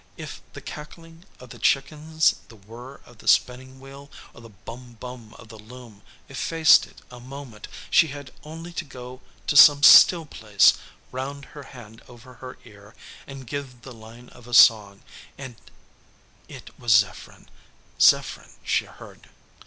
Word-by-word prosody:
If - - -10
the - - -11
cackling 165 +3 -13
of 125 -1 -15
the 120 - -13
chickens, 155 +6 0
the 115 - -17
whir 115 +6 -14
of 120 -2 -20
the - - -16
spinning 130 +1 0
wheel, 135 +1 -14 0.2
or - - -16
the 115 - -15
"bum 120 +4 -14
bum" 120 -3 -12
of 110 - -17
the 110 -1 -14
loom 115 -1 -15 0.3
effaced 160 +3 +2
it - - -21
a 125 - -12
moment, 130 -3 -12 0.2
she 165 - +4
had 140 -1 -11
only 165 +3 -11
to 175 - -5
go 130 -2 -13 0.2
to 145 - -3
some 145 -1 +7
still 170 +2 +7
place, 105 -8 +2 0.4
round 140 +2 -7
her 145 - -11 0.2
hand 115 -1 -15
over 125 +1 -17
her 125 +1 -12
ear, 105 +2 -18 0.3
and 135 -1 -11
give 130 -2 -9
the 130 - -12
line 115 +2 -16
of 120 - -18
a 120 - -3
song, 105 -5 +4 0.3
and 130 -3 -10 0.9
it - - -13
was 120 -3 +1
Zepherin 105 -3 -2 0.5
Zepherin - - +1
she - - -1
heard. - - -17
125 Hz, 160 wpm, -22 LUFS, 115-140 Hz, 0.9 s, some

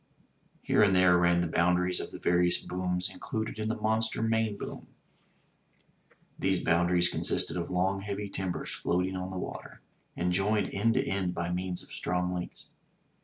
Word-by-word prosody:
Here - - +3
and 100 -2 +5
there 90 -1 +6
ran 85 0 +3
the 85 - 0
boundaries 90 +2 +2
of - - -5
the - - -9
various 90 0 +2
booms 90 0 -2
included 110 0 -4
in 110 0 -1
the 110 - 0
monster 110 +1 0
main 110 -2 +1
boom. - - -7 1.5
Those 95 -1 +2
boundaries 85 +1 +3
consisted - - 0
of 85 -1 -3
long 95 +2 0
heavy 100 +1 -4
timbers 95 -2 -3
floating 90 +2 -1
on 95 0 -4
the 95 - -5
water, - - -7 0.4
and 90 +1 0
joined 100 +1 +1
end 115 +3 +2
to - - +2
end 95 -2 -1
by 85 +1 -2
means 90 0 -2
of - - -14
strong 90 0 -1
links. 90 -1 -6
90 Hz, 170 wpm, -29 LUFS, 90-100 Hz, 1.5 s, there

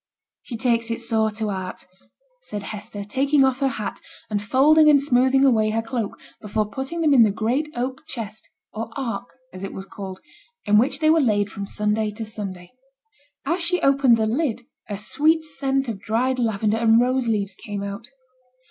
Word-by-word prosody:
'She 235 - -7
takes 230 0 +1
it 230 - -2
sore 225 -2 +1
to 215 0 -3
heart,' 185 -1 -6 0.6
said 205 - -6
Hester, 205 0 -6
taking 270 +6 +2
off 265 0 0
her 275 - +2
hat, 215 -5 -4 0.3
and 205 -1 0
folding 295 +8 +5
and 290 -1 +6
smoothing 265 0 +3
away 220 -5 +3
her 225 +1 -1
cloak, 230 -3 -4 0.2
before 210 0 -1
putting 270 +9 -4
them 305 -3 +4
in 255 - +7
the 220 - +6
great 235 +9 -1
oak 255 +2 -3
chest 220 -4 -7 0.2
(or 225 +1 -4
'ark,' 240 -3 -4 0.2
as 185 +1 -8
it 195 - -5
was 190 - -7
called), 190 -1 -8 0.5
in 210 0 +5
which 255 +7 +1
they 310 0 +5
were 325 0 +4
laid 205 -5 +1
from 200 -1 -6
Sunday 210 +1 0
to 215 +2 -6
Sunday. 195 -5 -7 0.7
As 340 +5 0
she 355 +1 +1
opened 275 -4 +5
the 220 - +1
lid 245 +1 -1 0.3
a 205 - -3
sweet 305 +11 +2
scent 275 -3 -1
of 215 -4 -5
dried 245 +4 0
lavender 220 -2 +1
and 225 0 +5
rose 255 0 +1
leaves 205 -3 0
came 205 -1 -6
out. 200 +3 -6
230 Hz, 185 wpm, -23 LUFS, 210-270 Hz, 0.7 s, in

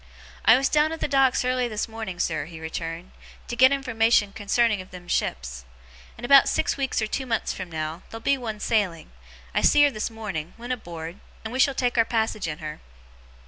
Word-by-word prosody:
'I 225 - +8
was 270 +1 +2
down 300 +2 +2
at 325 - -5
the - - -1
Docks 270 -3 +3
early 255 -1 +1
this 215 -3 -3
morning, 220 -5 -6
sir,' - - -1
he 165 -1 -10
returned, 165 +2 -5 0.4
'to 240 - -4
get 260 +2 +6
information 230 -6 +2
concerning 215 0 +1
of 185 - -13
them 180 -1 -11
ships. 60 - -2 0.5
In 235 - -6
about 275 +1 +7
six - - 0
weeks 270 -5 -1
or - - +2
two 260 +5 -3
months 225 -2 -1
from 185 -2 -7
now, 155 +2 -4
there'll 225 - -7
be 280 - +3
one 225 -5 -5
sailing 200 -8 -1 0.4
I - - +1
see 290 - +6
her 290 - +5
this 215 -2 -3
morning 195 -8 -6
went 240 +2 -4
aboard 170 -5 -7 0.2
and 220 +1 -6
we 260 - -3
shall 275 +1 +4
take 245 -2 0
our 230 - +5
passage 220 -5 -1
in 150 -1 -4
her. 155 -1 -7
225 Hz, 210 wpm, -25 LUFS, 175-255 Hz, 0.5 s, I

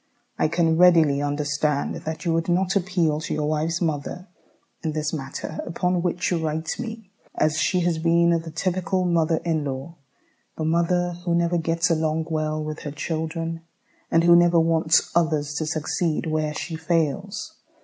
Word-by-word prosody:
I - - +3
can 165 0 +1
readily 165 -5 +5
understand 145 0 -1
that 160 +3 -6
you 165 - +1
would 165 +1 0
not 185 +2 +1
appeal 175 -5 +1
to 160 - -3
your 150 -1 -1
wife's 155 +3 -1
mother 160 +4 -3 0.5
in 160 -2 -1
this 155 0 -2
matter 145 +1 -5
upon 180 +1 -1
which 175 +1 -1
you 175 - +1
write 160 +4 -2
me, 225 -4 -7 0.3
as 155 +1 +2
she 180 +3 +2
has 170 -2 0
been 170 +1 +3
the 165 -1 -1
typical 185 +2 -1
mother 165 -2 +2
in 160 -3 0
law, 140 +4 -5 0.6
the 160 - -2
woman 170 +2 +1
who 170 -1 +1
never 170 0 +1
gets 165 +1 +1
along 160 0 0
well 155 -1 -1
with 155 0 -5
her 150 - -6
children, 165 +2 -3 0.5
and 165 0 +3
who 170 0 +7
never 175 0 +5
wants 160 0 +2
others 155 -4 +1
to 155 - -2
succeed 160 +1 -1
where 155 -1 -1
she 165 - -4
fails. 170 +5 -2
165 Hz, 170 wpm, -24 LUFS, 155-170 Hz, 0.6 s, who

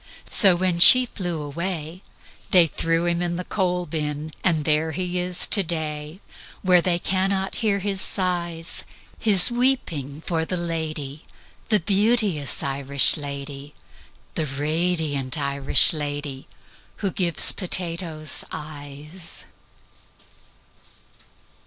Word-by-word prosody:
So 195 -5 +8
when 180 -1 -2
she 255 +8 +10
flew 175 -9 -6
away, 165 +2 -6 0.5
They 180 -2 +5
threw 165 +1 -2
him 170 0 -1
in 175 -1 -3
the 180 - -5
coal 180 -2 -3
bin 150 -1 -5
And 160 -5 0
there 160 +1 +1
he 180 0 -3
is 180 0 +2
to 200 - +2
day, 155 -1 -5 0.4
Where 180 -2 +3
they 175 0 0
cannot 190 +1 -2
hear 210 -3 0
his 195 -1 -3
sighs 175 -3 -2 0.4
His 205 -1 +6
weeping 170 - -1
for 165 -1 -3
the 180 +3 -4
lady, 155 -4 -5 0.5
The 215 -2 +2
beauteous 200 - 0
Irish 140 0 +2
lady, 140 -1 -8 0.6
The 155 - -4
radiant 150 -1 -2
Irish 140 0 +3
lady 145 -3 -5 0.6
Who 195 - -1
gives 170 -5 +4
potatoes 170 -4 -2
eyes." 150 +3 -8
165 Hz, 115 wpm, -21 LUFS, 150-185 Hz, 0.6 s, she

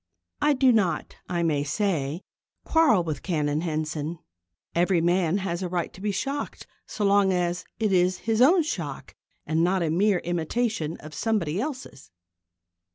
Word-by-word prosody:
I 295 0 +4
do 260 -1 +4
not, 190 -9 0
I 175 -1 0
may 150 -4 +1
say, 155 -2 -1 0.4
quarrel 305 - +4
with 155 -5 -4
Canon 150 -4 -1
Henson. 155 0 -3 0.6
Every 175 +1 +2
man 175 +1 +2
has 185 -3 -3
a 180 - -2
right 175 -1 -2
to 185 - -12
be 210 0 0
shocked 275 +8 -4 0.2
so 210 - -2
long 200 -1 +4
as 180 0 -1
it 215 -3 +1
is 180 0 +3
his 225 +1 +1
own 335 +6 +6
shock 310 - -5 0.3
and 160 +1 +1
not 180 +1 +2
a 160 - 0
mere 195 +3 +3
imitation 175 +1 -2
of 155 0 -10
somebody 195 -3 -1
else's. 255 - -6
180 Hz, 160 wpm, -26 LUFS, 165-210 Hz, 0.6 s, own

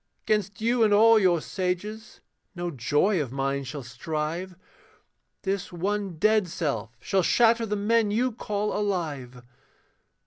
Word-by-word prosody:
'Gainst 205 -2 0
you 235 +2 +1
and 215 - +3
all 225 +1 +7
your 180 -4 +3
sages, 205 +6 -4 0.3
no 175 0 -3
joy 150 - +1
of 130 -5 -4
mine 135 +1 -1
shall 135 +1 -6
strive, 155 +9 -4 0.9
This 195 -1 -2
one 195 0 -2
dead 215 +1 +3
self 115 -9 -3
shall 190 - +1
shatter 230 +4 +3
the 210 - -1
men 215 +1 +2
you 245 +5 +1
call 210 -2 -3
alive. 150 -12 -3
190 Hz, 135 wpm, -26 LUFS, 150-210 Hz, 0.9 s, all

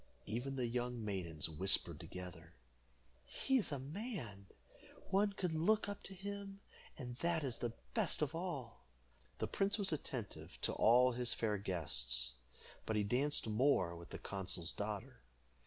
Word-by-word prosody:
Even 130 +5 -2
the 125 -2 0
young 120 -1 -1
maidens 85 -7 -1
whispered 90 +5 +3
together, 90 -2 -8 0.7
"He 265 -1 +1
is 220 - 0
a 145 - 0
man; 135 - -5 0.6
one 200 +1 +4
could 180 -4 -1
look 210 +8 +3
up 205 0 -4
to 195 - -8
him, 200 +1 -5 0.4
and 125 -4 -6
that 170 +1 +1
is 130 -4 -2
the 120 -1 -1 0.2
best 205 -8 +2
of 150 - -1
all." 145 - -4 0.5
The - - 0
prince 200 +2 +1
was 195 -5 +1
attentive 125 -7 -4
to - - +2
all 125 +3 +6
his 120 0 -1
fair 105 -3 +1
guests, 65 - +1 0.5
but 110 - +1
he 105 - +3
danced 130 +8 +2
more 110 -6 +3
with 85 +1 -10
the - - -5
consul's 95 -3 -1
daughter. 105 - -4
125 Hz, 155 wpm, -38 LUFS, -, 0.7 s, all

